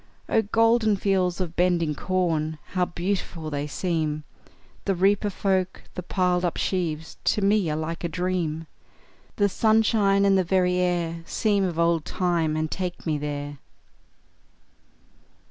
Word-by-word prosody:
Oh, 225 - +3
golden 225 0 +3
fields 185 -2 +1
of 175 -2 -3
bending 175 -3 +2
corn, 160 -2 -1
How 180 -2 +1
beautiful 175 -3 -3
they 145 0 -2
seem! 155 -1 -2 0.6
The 195 - +1
reaper 200 +3 +2
folk, 190 -1 -1
the - - -5
piled 180 0 0
up 175 - -1
sheaves, 165 -4 -2
To 210 - +2
me 200 -3 +3
are 150 - -1
like 165 +2 -4
a 170 - -1
dream; 165 -2 -2 0.7
The 205 - +3
sunshine, 210 -1 +3
and 195 -1 +4
the - - +3
very 180 0 +2
air 175 -2 0
Seem 205 -3 +1
of 175 -3 -2
old 170 -1 +2
time, 170 -4 0
and 155 0 -2
take 180 -2 -4
me 155 -3 0
there! 145 -1 -5
180 Hz, 145 wpm, -25 LUFS, 160-195 Hz, 0.7 s, and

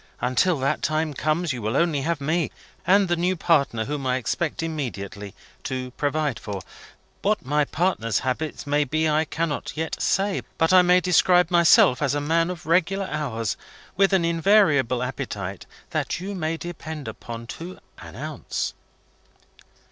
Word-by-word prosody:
Until 130 +8 +2
that 135 +1 0
time 155 0 0
comes, 155 +3 0
you 120 - -5
will 110 +5 -1
only 165 -5 +2
have 165 +2 -1
me, 155 +3 0 0.4
and 195 +1 +5
the 175 - +1
new 180 +2 +1
partner 140 -10 +2
whom 140 0 -3
I 125 - +2
expect 145 +7 -2
immediately, 105 -11 -5 0.3
to 130 -1 -3
provide 145 -1 -1
for. 100 -2 -5 0.6
What 205 -7 0
my 150 +2 +2
partner's 140 - 0
habits 150 +6 -3
may 145 +1 +2
be, 155 +3 0
I 155 +1 +2
cannot 160 -1 -3
yet 160 +1 -3
say. 195 0 +1 0.2
But 165 +2 +3
I 185 - +9
may 180 0 +4
describe 180 -1 +4
myself 170 -7 +5
as 145 -1 +1
a - - +1
man 165 +3 +1
of 175 -2 -6
regular 185 +4 +1
hours, 115 -8 -2 0.4
with 195 +2 +3
an 190 -3 +3
invariable 165 - +3
appetite 100 -6 -5 0.2
that - - -1
you 195 +3 -5
may 165 -3 -2
depend 160 -4 -7
upon 115 +1 -7
to 175 +3 -8 0.2
an - - -11
ounce." - - -4
155 Hz, 160 wpm, -24 LUFS, 130-175 Hz, 0.6 s, I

